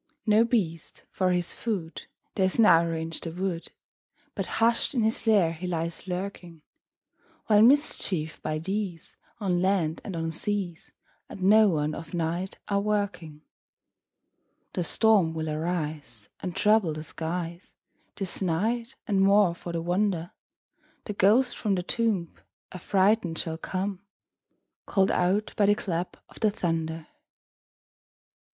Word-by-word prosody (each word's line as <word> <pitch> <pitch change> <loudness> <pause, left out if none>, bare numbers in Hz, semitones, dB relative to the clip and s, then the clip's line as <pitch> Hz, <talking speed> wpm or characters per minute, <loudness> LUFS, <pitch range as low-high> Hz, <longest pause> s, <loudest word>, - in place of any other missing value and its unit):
No 215 0 +5
beast, 185 -10 -2
for 185 -1 +1
his 175 -1 0
food, 190 -8 -4 0.3
Dares 190 -1 +1
now 170 -7 +6
range 165 -1 -3
the 165 - -5
wood, 180 -1 -3 0.6
But 195 -3 -3
hush'd 230 +5 +2
in 235 - +2
his 220 +1 -1
lair 195 -7 +4
he 175 +3 -6
lies 170 +1 -3
lurking; 180 -3 -5 0.8
While 210 -2 +5
mischiefs, 215 - +2
by 155 0 -2
these, 185 0 -4 0.2
On 180 -4 0
land 185 -5 +1
and 195 - -6
on 165 0 -2
seas, 180 0 -3 0.4
At - - -9
noon 185 -7 +4
of 165 +3 -7
night 170 +3 -2
are 200 - +1
a - - -1
working. 200 -7 -2 1.3
The 180 - -1
storm 195 -3 +3
will 160 -1 -2
arise, 150 -8 -4
And 180 -2 -5
trouble 210 -6 +3
the 155 0 -6
skies 165 +2 -5 0.4
This 195 -1 -2
night; 225 +8 -1
and, 200 -3 +1
more 200 -2 +5
for 170 0 -7
the 165 -1 -3
wonder, 175 -1 0 0.7
The 210 - -4
ghost 225 +6 +3
from 205 -3 0
the 180 - -2
tomb 205 -5 -1 0.4
Affrighted 185 -1 +1
shall 160 -1 -3
come, 190 +2 -3 0.9
Call'd 195 -1 +2
out 190 +4 +1
by 205 - +3
the 205 - +5
clap 175 -3 -3
of - - -15
the 215 - +3
thunder. 165 -4 -2
43. - - -30
180 Hz, 140 wpm, -27 LUFS, 165-205 Hz, 1.3 s, now